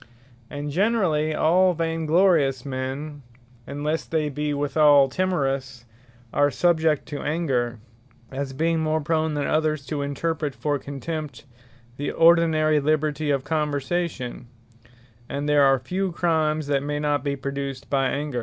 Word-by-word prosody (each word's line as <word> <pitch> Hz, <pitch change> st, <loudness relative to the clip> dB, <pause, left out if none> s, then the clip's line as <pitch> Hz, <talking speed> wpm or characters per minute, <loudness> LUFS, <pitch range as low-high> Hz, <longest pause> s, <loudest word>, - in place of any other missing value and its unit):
And 145 Hz, 0 st, -5 dB
generally 170 Hz, -5 st, +1 dB
all 180 Hz, +4 st, +3 dB
vain 165 Hz, -1 st, -2 dB
glorious 155 Hz, -7 st, +3 dB
men, 135 Hz, +3 st, -5 dB, 0.5 s
(unlesse 150 Hz, +3 st, -2 dB
they 155 Hz, -2 st, 0 dB
be 150 Hz, +1 st, -2 dB
withall 145 Hz, -1 st, +4 dB
timorous,) 135 Hz, -7 st, -2 dB, 0.5 s
are 145 Hz, 0 st, +3 dB
subject 160 Hz, -2 st, +1 dB
to 145 Hz, -2 st, -5 dB
Anger; 135 Hz, -7 st, -1 dB, 0.5 s
as 135 Hz, 0 st, -4 dB
being 165 Hz, +4 st, 0 dB
more 155 Hz, 0 st, 0 dB
prone 155 Hz, 0 st, 0 dB
than 145 Hz, -1 st, -1 dB
others 155 Hz, -2 st, 0 dB
to 145 Hz, +2 st, -3 dB
interpret 145 Hz, +1 st, -2 dB
for 145 Hz, -2 st, -1 dB
contempt, 140 Hz, -2 st, -6 dB, 0.5 s
the 145 Hz, -, -2 dB
ordinary 160 Hz, -2 st, +4 dB
liberty 155 Hz, 0 st, 0 dB
of 140 Hz, -2 st, +1 dB
conversation: 150 Hz, -4 st, -2 dB, 0.8 s
And 140 Hz, +1 st, -3 dB
there 150 Hz, -1 st, +4 dB
are 135 Hz, -1 st, +5 dB
few 185 Hz, +9 st, -3 dB
Crimes 155 Hz, -3 st, 0 dB
that 140 Hz, -1 st, 0 dB
may 145 Hz, +1 st, -3 dB
not 145 Hz, -2 st, 0 dB
be 140 Hz, -1 st, -1 dB
produced 140 Hz, 0 st, -5 dB
by 135 Hz, -1 st, +2 dB
Anger. 140 Hz, -1 st, -2 dB
150 Hz, 135 wpm, -24 LUFS, 140-160 Hz, 0.8 s, are